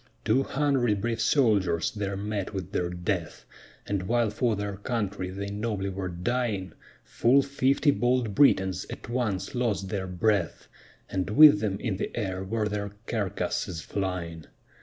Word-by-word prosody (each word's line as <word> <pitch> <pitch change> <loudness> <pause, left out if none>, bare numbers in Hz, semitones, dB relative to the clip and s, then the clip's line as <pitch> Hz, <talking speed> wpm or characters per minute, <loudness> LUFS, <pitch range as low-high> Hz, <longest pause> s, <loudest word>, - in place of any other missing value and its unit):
Two 135 - +3
hundred 135 -7 +1
brave 115 +2 -2
soldiers 100 - +2
there 100 -2 -3
met 100 0 -3
with 95 -3 -5
their 90 -1 -1
death; 90 -1 -3 0.4
And 95 -2 -2
while 120 -2 +2
for 115 0 +1
their 100 -1 -4
country 105 -4 -3
they 100 +2 -5
nobly 105 -2 -2
were 95 -1 -4
dying, 95 0 -2 0.3
Full 135 +4 +3
fifty 140 +1 +2
bold 120 -1 +1
Britons 95 - +3
at - - -8
once 120 -3 -2
lost 115 -6 -1
their 95 -2 -3
breath, 90 0 0 0.4
And 95 -1 -2
with 145 0 +8
them 100 -2 -2
in 110 -6 -2
the - - -2
air 95 -4 -2
were 105 +2 -1
their 100 -1 -3
carcasses 95 -5 -2
flying. 90 -5 -4
100 Hz, 150 wpm, -27 LUFS, 95-120 Hz, 0.4 s, with